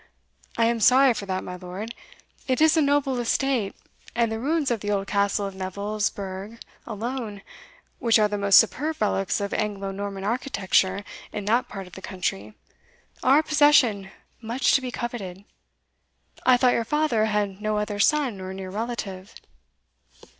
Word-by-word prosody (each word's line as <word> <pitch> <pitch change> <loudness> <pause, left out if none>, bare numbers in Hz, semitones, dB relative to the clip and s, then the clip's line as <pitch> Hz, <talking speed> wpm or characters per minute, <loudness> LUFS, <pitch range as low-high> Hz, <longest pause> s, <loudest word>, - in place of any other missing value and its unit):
I 230 - +3
am 230 0 +1
sorry 255 +3 +6
for 200 -3 -6
that, 185 -1 -2
my 180 - -7
lord 185 +6 -7 0.5
it 255 -1 +1
is 315 +1 +5
a 320 - +4
noble 280 -3 +1
estate, 240 -3 0 0.4
and 235 -2 +1
the 220 - -3
ruins 295 +2 0
of 235 - 0
the 205 - -4
old 200 -1 0
castle 200 0 0
of 195 - -5
Neville's 200 +2 -2
Burgh 195 +3 -7 0.3
alone, 225 -2 -5 0.6
which 230 -3 +4
are 215 -1 +4
the 210 - -3
most 200 -1 +6
superb 300 +8 +2
relics 195 -2 0
of 200 0 -3
Anglo 200 -2 -2
Norman 195 0 -5
architecture 200 -4 0 0.3
in 205 - -5
that 235 +4 +2
part 195 -1 -7
of 180 - -16
the 190 - -9
country, 110 - -4 0.7
are 265 +2 +5
a 310 - +3
possession 285 -10 +4 0.3
much 235 +3 +1
to 270 - +4
be 255 - -4
coveted. 205 -6 -6 1.0
I 255 -1 +7
thought 250 0 +4
your 230 - +1
father 295 -5 +1
had 210 -2 -1
no 215 0 0
other 210 -1 -2
son 255 -4 +2
or 185 0 -6
near 190 -1 -7
relative." 205 -3 -5
215 Hz, 170 wpm, -25 LUFS, 195-250 Hz, 1.0 s, I